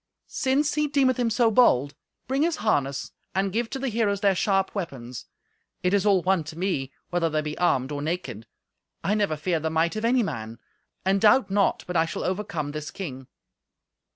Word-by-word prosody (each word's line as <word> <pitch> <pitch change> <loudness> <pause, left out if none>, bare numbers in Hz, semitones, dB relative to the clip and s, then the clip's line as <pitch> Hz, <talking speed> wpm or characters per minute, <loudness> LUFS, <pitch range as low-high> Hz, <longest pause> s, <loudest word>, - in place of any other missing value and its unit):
"Since 275 +3 0
he 300 0 +1
deemeth 275 -3 +2
him 240 -2 +1
so 230 0 +3
bold, 145 - +4 0.3
bring 270 +2 0
his 330 +1 +2
harness, 140 - -1 0.2
and 195 0 0
give 230 +1 -1
to - - -4
the 270 0 -2
heroes 210 -3 0
their 200 -2 +4
sharp 195 +1 +1
weapons. 130 - -6 0.6
It 180 +1 +2
is 200 +1 +2
all 190 -4 +4
one 185 -3 +2
to 155 +1 -9
me 170 -8 -1 0.2
whether 175 -2 +1
they 155 0 0
be 150 0 -4
armed 135 -6 +1
or 145 -1 -3
naked. 145 - -4 0.6
I 200 - +1
never 205 -7 0
feared 165 +1 -1
the 160 - -1
might 160 +4 +1
of 215 - -3
any 240 +1 +3
man, 115 - -5 0.5
and 195 +1 +2
doubt 220 +1 +5
not 200 0 +2
but 180 - -6
I 160 -1 +4
shall 170 - -4
overcome 180 -6 -2
this 155 0 -5
king." 135 -9 -7
185 Hz, 195 wpm, -25 LUFS, 150-220 Hz, 0.6 s, doubt